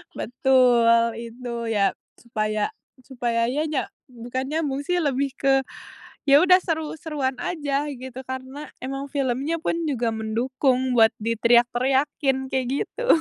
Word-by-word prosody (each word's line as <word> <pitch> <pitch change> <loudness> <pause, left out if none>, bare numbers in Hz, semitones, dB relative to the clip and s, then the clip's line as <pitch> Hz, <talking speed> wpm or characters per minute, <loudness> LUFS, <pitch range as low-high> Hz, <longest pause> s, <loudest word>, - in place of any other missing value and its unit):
Betul, 240 -2 +3
itu. 235 0 -6
Ya, 200 -3 +2 0.2
supaya 215 - -2 0.3
supaya 235 -3 -1
ya 265 +5 -1
nya 295 -4 0 0.3
bukan 250 +2 -5
nyambung 295 -3 -1
sih 360 +5 -1
lebih 280 -4 0
ke, 270 -1 +3 0.7
ya 280 +2 +7
udah 365 0 +6
seru-seruan 305 -5 -3
aja 290 -1 -2
gitu 260 -2 -7
karena 260 +3 -6 0.2
emang 270 +2 -4
filmnya 275 +3 -1
pun 330 - -1
juga 245 -5 0
mendukung 255 +4 0
buat 225 0 +6
diteriak-teriakin, 255 +4 +2
kayak 260 -2 0 0.2
gitu. - - -6
260 Hz, 125 wpm, -24 LUFS, 235-280 Hz, 0.7 s, ya